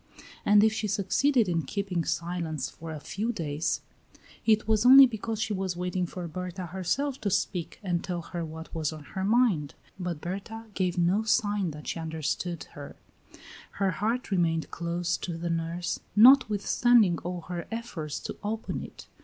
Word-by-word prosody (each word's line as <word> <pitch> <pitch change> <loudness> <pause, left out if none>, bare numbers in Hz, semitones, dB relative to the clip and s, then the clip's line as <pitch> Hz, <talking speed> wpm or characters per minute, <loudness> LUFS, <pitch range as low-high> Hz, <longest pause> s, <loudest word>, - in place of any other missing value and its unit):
And 205 0 +6
if 220 0 +4
she 215 0 -2
succeeded 210 +5 +2
in 170 -2 +1
keeping 180 +2 -2
silence 170 -3 -2
for 165 - -9
a 155 - -5
few 215 +9 -3
days, 155 -7 -2 0.7
it 215 -1 +4
was 220 -1 +3
only 265 +2 +10
because 225 -2 -3
she 220 -1 -1
was 190 -2 -2
waiting 180 0 -1
for 175 0 -6
Berta 180 +2 -5
herself 205 - -2
to 210 - 0
speak 180 -2 -2
and 175 -3 -1
tell 175 -2 -3
her 170 0 -5
what 160 0 -8
was 160 -2 -1
on 155 -1 -9
her 190 - -2
mind; 200 - +2 0.2
but 175 -4 -3
Berta 200 +7 -6
gave 185 -2 -1
no 175 +4 +3
sign 210 -4 +1
that 150 -1 -9
she - - -3
understood 160 +1 -3
her; 145 -1 -9 0.8
her 195 -1 +1
heart 220 +7 -2
remained 165 -3 +1
closed 170 +1 -2
to 170 -2 -4
the 170 0 -2
nurse, 165 +1 -2 0.2
notwithstanding 220 -4 +5
all 180 0 -5
her 175 0 -6
efforts 190 -10 -4
to - - -5
open 220 +2 -3
it. - - -10
180 Hz, 170 wpm, -28 LUFS, 170-215 Hz, 0.8 s, only